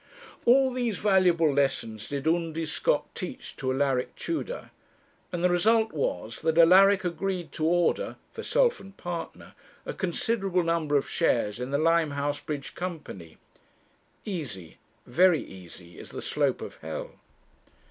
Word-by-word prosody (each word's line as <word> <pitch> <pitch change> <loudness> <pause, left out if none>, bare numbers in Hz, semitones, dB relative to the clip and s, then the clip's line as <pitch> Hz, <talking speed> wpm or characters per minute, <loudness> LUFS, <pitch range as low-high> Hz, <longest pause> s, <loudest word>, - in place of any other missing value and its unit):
All 260 +2 +5
these 240 -5 -1
valuable 180 -6 +3
lessons 130 -6 -1
did 140 +1 -3
Undy 165 -1 0
Scott - - 0
teach - - -7
to 130 -1 -1
Alaric 130 -1 0
Tudor, 395 +9 -4 0.6
and 175 -1 -3
the 180 - +4
result 220 +5 +3
was 110 - -3
that 160 0 0
Alaric 190 +3 +6
agreed 180 0 -2
to 155 - -2
order 175 - +1 0.2
for - - -7
self - - +2
and 195 0 -13
partner 175 -1 -6 0.3
a - - -4
considerable 190 0 0
number 165 -3 0
of 135 - -1
shares 115 -9 +1
in 125 +1 -4
the 140 - +1
Limehouse 145 -3 +1
Bridge 145 -1 -5
Company. 150 - -7 0.9
Easy, 125 - -6 0.3
very 175 +6 +4
easy, 90 -2 -12
is - - -10
the - - -7
slope - - 0
of - - -9
hell. 80 +1 -6
165 Hz, 140 wpm, -27 LUFS, 140-190 Hz, 0.9 s, Alaric